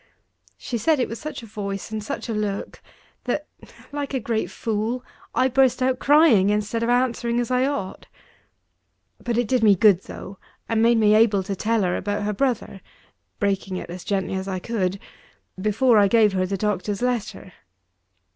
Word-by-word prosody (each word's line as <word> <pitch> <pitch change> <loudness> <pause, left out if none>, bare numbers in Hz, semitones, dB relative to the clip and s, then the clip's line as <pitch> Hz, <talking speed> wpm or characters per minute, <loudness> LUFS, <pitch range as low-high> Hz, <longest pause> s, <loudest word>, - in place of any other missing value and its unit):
She 240 -3 -4
said 310 +6 +2
it 250 - +1
with 230 - -7
such 305 -5 -7
a - - -8
voice 200 -2 -5
and 215 -1 -4
such 280 +4 -5
a 230 - -2
look, 210 -2 -3 0.4
that, 295 +4 -1 0.5
like 285 -1 -4
a - - +1
great 220 -5 -2
fool, 225 +5 -3 0.3
I 260 - +3
burst 260 -1 +3
out 255 0 +1
crying, 280 - +5
instead 210 +2 -1
of 230 - 0
answering 240 -1 +1
as 240 0 -2
I 255 +1 +2
ought. 240 -10 -4 1.2
But 235 -2 -1
it 240 -2 +1
did 255 0 +1
me 210 -3 +6
good, 195 -1 +5
though, 195 0 -9 0.3
and 225 -1 +1
made 235 +1 +4
me 210 -1 +4
able 215 -3 +4
to 195 +1 -4
tell 220 +2 0
her 180 -1 0
about 205 +1 -2
her 210 0 -1
brother 230 -4 -2 0.6
(breaking 195 -2 -1
it 175 - -7
as 180 0 -8
gently 195 -2 -2
as 190 0 -3
I 190 -1 -2
could) 195 -2 -2 0.6
before 215 +3 +3
I 200 - +5
gave 215 -1 +4
her 185 -1 0
the 195 +1 -2
doctor's 210 +2 -2
letter. 230 -6 -3
220 Hz, 185 wpm, -23 LUFS, 200-245 Hz, 1.2 s, me